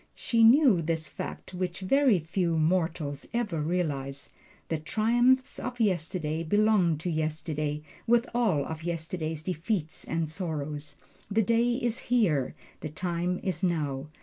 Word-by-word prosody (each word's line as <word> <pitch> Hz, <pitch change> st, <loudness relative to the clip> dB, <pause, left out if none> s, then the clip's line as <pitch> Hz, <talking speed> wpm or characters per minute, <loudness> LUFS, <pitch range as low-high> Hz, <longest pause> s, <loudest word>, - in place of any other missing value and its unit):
She 230 Hz, -1 st, +2 dB
knew 235 Hz, -, +6 dB
this 160 Hz, 0 st, -1 dB
fact -, -, -7 dB
which 180 Hz, 0 st, -3 dB
very 260 Hz, +3 st, +4 dB
few 170 Hz, +1 st, -1 dB
mortals 160 Hz, -3 st, 0 dB
ever 205 Hz, -10 st, -1 dB
realize: 145 Hz, -5 st, -2 dB, 0.4 s
The 160 Hz, -, -1 dB
triumphs 240 Hz, -, +2 dB
of 245 Hz, -1 st, -5 dB
yesterday 165 Hz, -5 st, 0 dB
belong 200 Hz, -2 st, +3 dB
to 165 Hz, +4 st, -3 dB
yesterday, 155 Hz, -1 st, -2 dB, 0.2 s
with 235 Hz, +1 st, +4 dB
all 205 Hz, -, +2 dB
of 160 Hz, 0 st, -6 dB
yesterday's 160 Hz, -2 st, -3 dB
defeats 175 Hz, -1 st, -2 dB
and 165 Hz, -1 st, -1 dB
sorrows 150 Hz, -3 st, -4 dB, 0.3 s
the 220 Hz, +2 st, +2 dB
day 235 Hz, +3 st, +2 dB
is 240 Hz, -1 st, -1 dB
Here, 180 Hz, -, +1 dB, 0.2 s
the 155 Hz, -, -5 dB
time 175 Hz, +2 st, -2 dB
is 185 Hz, -5 st, -2 dB
Now. 150 Hz, -6 st, -1 dB
170 Hz, 135 wpm, -28 LUFS, 155-215 Hz, 0.4 s, knew